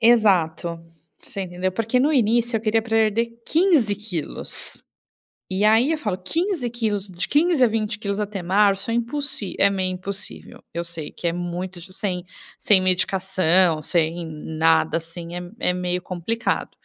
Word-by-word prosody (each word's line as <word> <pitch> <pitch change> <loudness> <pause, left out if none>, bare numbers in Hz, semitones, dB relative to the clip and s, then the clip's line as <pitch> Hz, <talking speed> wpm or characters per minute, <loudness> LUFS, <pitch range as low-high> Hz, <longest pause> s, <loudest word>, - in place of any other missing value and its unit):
Exato, 180 -8 +3 0.4
você 195 - -6
entendeu. 180 +1 -2
Porque 230 +4 0
no 295 +4 +3
início 235 -1 +2
eu - - -1
queria 220 0 +2
perder 225 0 +2 0.2
15 315 - +3
quilos. 200 -7 -4 0.7
E 190 +2 0
aí 225 +7 +5
eu 320 - +1
falo 210 -10 -2
15 315 - -1
quilos, 210 -4 -1
de 180 -1 -4
15 315 -2 +3
a - - +7
20 215 -2 -2
quilos 200 -1 -2
até 205 -2 -3
março 195 +3 +2
é 230 - 0
impossi 235 -3 -2
é 200 - +6
meio 190 -1 -1
impossível, 195 +2 -7
eu 170 +1 -2
sei 165 -3 -5
que 175 - -4
é - - +2
muito 175 +1 -4
sem 180 -3 -3 0.3
sem 200 -3 +4
medicação, 185 -2 +3
sem 165 +1 0 0.2
nada, 160 0 +2
assim, 170 +1 -7
é 175 - -4 0.2
é - - +2
meio 180 0 -2
complicado. 185 +6 -2
195 Hz, 155 wpm, -23 LUFS, 175-225 Hz, 0.7 s, a